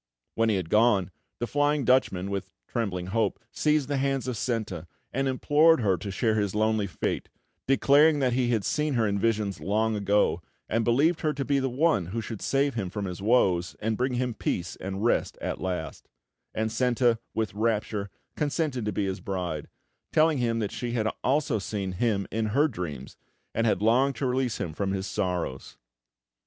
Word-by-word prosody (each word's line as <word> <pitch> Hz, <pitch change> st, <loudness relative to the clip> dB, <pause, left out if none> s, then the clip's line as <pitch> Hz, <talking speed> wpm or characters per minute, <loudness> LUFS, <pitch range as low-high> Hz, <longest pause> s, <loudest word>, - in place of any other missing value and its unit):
When 115 Hz, 0 st, +2 dB
he 105 Hz, -, +2 dB
had 90 Hz, -4 st, -3 dB
gone, 105 Hz, -5 st, +4 dB, 0.3 s
the 120 Hz, -, -2 dB
Flying 145 Hz, +1 st, +1 dB
Dutchman, 100 Hz, -7 st, +2 dB
with 100 Hz, -1 st, -3 dB, 0.2 s
trembling 95 Hz, -6 st, -2 dB
hope, 115 Hz, -1 st, +1 dB
seized 150 Hz, -3 st, +1 dB
the 145 Hz, -1 st, -1 dB
hands 135 Hz, -1 st, 0 dB
of 125 Hz, -, -2 dB
Senta 105 Hz, -8 st, -3 dB, 0.3 s
and 135 Hz, +1 st, 0 dB
implored 150 Hz, +3 st, +4 dB
her 100 Hz, -4 st, +3 dB
to 95 Hz, +4 st, -6 dB
share 110 Hz, +3 st, +1 dB
his 105 Hz, -2 st, 0 dB
lonely 110 Hz, -1 st, +1 dB
fate, 90 Hz, -, -3 dB, 0.4 s
declaring 145 Hz, +3 st, +5 dB
that 130 Hz, -3 st, +1 dB
he 125 Hz, -1 st, +1 dB
had 110 Hz, -5 st, +1 dB
seen 150 Hz, -2 st, 0 dB
her 115 Hz, -2 st, +2 dB
in 100 Hz, -1 st, 0 dB
visions 105 Hz, -3 st, 0 dB
long 110 Hz, +2 st, 0 dB
ago, 100 Hz, 0 st, +2 dB, 0.3 s
and 115 Hz, +1 st, 0 dB
believed 145 Hz, +9 st, +2 dB
her 155 Hz, -1 st, +1 dB
to 140 Hz, -1 st, -3 dB
be 140 Hz, -1 st, +2 dB
the 135 Hz, 0 st, 0 dB
one 130 Hz, -, +2 dB
who 110 Hz, +6 st, -3 dB
should 110 Hz, -1 st, -6 dB
save 140 Hz, 0 st, +1 dB
him 100 Hz, -6 st, -3 dB
from 100 Hz, +2 st, -4 dB
his 90 Hz, 0 st, -5 dB
woes, 95 Hz, -6 st, +2 dB
and 110 Hz, +1 st, -1 dB
bring 125 Hz, +2 st, -1 dB
him 125 Hz, -1 st, -1 dB
peace 90 Hz, -4 st, -3 dB
and 95 Hz, +3 st, -4 dB
rest 120 Hz, -, +1 dB
at -, -, -4 dB
last; 90 Hz, -4 st, -4 dB, 0.5 s
and 110 Hz, 0 st, -1 dB
Senta, 120 Hz, -1 st, +2 dB, 0.2 s
with 110 Hz, -4 st, -1 dB
rapture, 105 Hz, -1 st, -1 dB, 0.3 s
consented 145 Hz, -5 st, -1 dB
to 105 Hz, -, 0 dB
be 105 Hz, -, -1 dB
his 95 Hz, 0 st, -3 dB
bride, 90 Hz, -5 st, -4 dB, 0.4 s
telling 155 Hz, -2 st, +3 dB
him 115 Hz, -2 st, +1 dB
that 105 Hz, -3 st, -2 dB
she 120 Hz, -1 st, -4 dB
had 110 Hz, -3 st, 0 dB, 0.2 s
also 140 Hz, -3 st, +1 dB
seen 100 Hz, -1 st, -3 dB
him 100 Hz, +1 st, 0 dB
in 110 Hz, 0 st, 0 dB
her 140 Hz, +9 st, +3 dB
dreams, 80 Hz, -, -6 dB, 0.4 s
and 115 Hz, +1 st, +1 dB
had 105 Hz, -2 st, +1 dB
longed 130 Hz, +5 st, +3 dB
to 140 Hz, -, -2 dB
release 125 Hz, -2 st, 0 dB
him 80 Hz, -, -3 dB
from 95 Hz, +3 st, -2 dB
his 95 Hz, -1 st, -2 dB
sorrows. 90 Hz, -5 st, -3 dB
110 Hz, 190 wpm, -27 LUFS, 100-130 Hz, 0.5 s, declaring